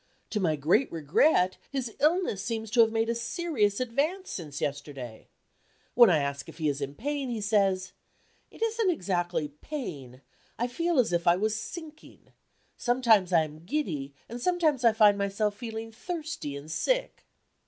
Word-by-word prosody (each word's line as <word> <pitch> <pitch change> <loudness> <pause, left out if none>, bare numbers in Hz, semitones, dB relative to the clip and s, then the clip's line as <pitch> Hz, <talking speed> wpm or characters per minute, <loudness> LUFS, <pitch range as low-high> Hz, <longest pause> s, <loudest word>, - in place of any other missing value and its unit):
To 215 - 0
my 165 -5 +1
great 170 - +2
regret, 180 - +3
his 255 -5 -3
illness 305 - +2
seems 220 -1 -3
to 235 0 +6
have 225 -1 +4
made 225 0 +1
a 235 - +1
serious 230 - 0
advance 290 +10 -1
since 150 -6 -6
yesterday. 140 -5 -5 0.7
When 240 -3 +8
I 170 - +4
ask 140 -1 -3
if - - -12
he 160 -2 -1
is 140 0 -3
in 140 +1 -4
pain, 285 - -3
he 235 -2 -2
says: 195 -3 +1 0.6
"It - - -6
isn't 455 -3 +1
exactly 175 - -1
pain; 145 - -7 0.3
I 240 - 0
feel 335 +7 -1
as 240 -8 +3
if 170 0 0
I 170 - +7
was 215 +3 0
sinking. 310 +7 -9 0.5
Sometimes 230 -7 +3
I 165 -2 +5
am 155 +1 -9
giddy; 170 - -2 0.2
and 240 +1 -7
sometimes 315 -5 +1
I 230 - +7
find 210 -2 +5
myself 200 +1 0
feeling 225 0 -6
thirsty 315 - -5
and 150 +3 -9
sick." - - -1
220 Hz, 165 wpm, -28 LUFS, 170-270 Hz, 0.7 s, When